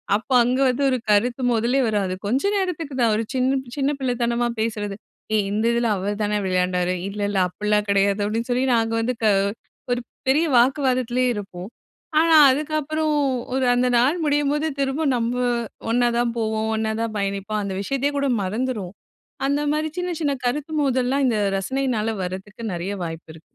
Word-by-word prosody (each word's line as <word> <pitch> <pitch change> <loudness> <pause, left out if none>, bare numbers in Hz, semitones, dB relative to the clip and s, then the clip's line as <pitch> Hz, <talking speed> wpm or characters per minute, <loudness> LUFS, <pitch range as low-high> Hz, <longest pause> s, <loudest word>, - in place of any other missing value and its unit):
அப்ப 220 - -4
அங்கே 255 +3 +1
வந்து 255 +3 -1
ஒரு 255 - +1
கருத்து 235 +5 +2
மோதலே 235 +3 +1
வரும். 205 -3 0
அது 185 - -3
கொஞ்ச 260 - +1
நேரத்துக்கு 335 -7 -3
தான், 230 -2 +4
ஒரு 225 - 0
சின்ன 260 +1 +1 0.2
சின்ன 280 0 +1
பிள்ளைத்தனமா 240 -2 0
பேசுறது. 210 -3 -2 0.4
"ஏய்! 210 -2 +2
இந்த 215 +2 0
இதுல 235 -1 +1
அவர்தானே 205 +2 -1
விளையாண்டாரு." 180 0 0
"இல்ல, 205 +1 -6
இல்ல 200 -2 0
அப்புட்லாம் 210 +2 -1
கிடையாது." 200 0 +2
அப்பிடின்னு 225 +4 -2
சொல்லி, 250 +2 +1
நாங்க 225 -1 +1
வந்து 245 +2 -1
க - - +5 0.6
ஒரு 245 0 0 0.3
பெரிய 305 +5 +4
வாக்குவாதத்திலேயே 255 -1 +2
இருப்போம். 195 -2 -7 0.5
ஆனா, 325 0 +5 0.2
அதுக்கப்புறம் 310 +2 -1 0.4
ஒரு 260 -1 +1
அந்த 250 +1 +2
நாள் 265 +9 +3
முடியும்போது 295 +1 +1
திரும்பவும் 275 +1 0
நம்ம 235 +1 -1 0.6
ஒன்னா 240 +1 +3
தான் 240 -1 0
போவோம். 220 0 -1
ஒன்னா 220 0 -1
தான் 225 -2 -3
பயணிப்போம். 200 +2 -2
அந்த 195 -1 -3
விஷயத்தையே 275 +6 -1
கூட 280 0 +1 0.2
மறந்துருவோம். 210 -2 -3 0.5
அந்தமாரி 295 +2 0
சின்ன, 360 0 -2
சின்ன 290 -2 +1
கருத்து 295 +5 -2
மோதல்லாம் 265 0 +1
இந்த 225 -3 +1 0.2
ரசனையினால 235 +1 -1
வரதுக்கு 195 +5 -7
நிறைய 175 +3 -3
வாய்ப்பு 165 -1 -7
இருக்கு. 160 - -14
240 Hz, 160 wpm, -22 LUFS, 210-270 Hz, 0.6 s, க